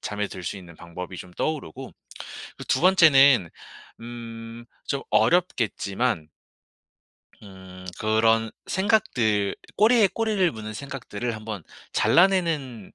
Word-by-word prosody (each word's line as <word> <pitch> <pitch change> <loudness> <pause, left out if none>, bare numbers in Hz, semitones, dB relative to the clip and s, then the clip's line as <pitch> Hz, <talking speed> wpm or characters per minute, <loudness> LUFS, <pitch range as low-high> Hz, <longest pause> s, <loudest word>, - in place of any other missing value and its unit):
잠에 105 0 -3
들 90 - -9
수 100 - -4
있는 85 -3 -12
방법이 90 +2 -8
좀 90 - -10
떠오르고 150 - -4 0.7
그 - - -8
2 130 - +1
번째는 140 - +6 0.5
음 115 0 -9 0.2
좀 140 -1 -2
어렵겠지만 120 - +1 1.2
음. 95 -2 -13
그런 110 +1 +2
생각들 125 - +1 0.2
꼬리에 220 0 +5
꼬리를 215 -6 +1
무는 110 -1 -7
생각들을 120 -3 -5
한번 110 -4 -7 0.3
잘라내는 165 - +2
115 Hz, 225 characters per minute, -24 LUFS, 100-155 Hz, 1.2 s, 번째는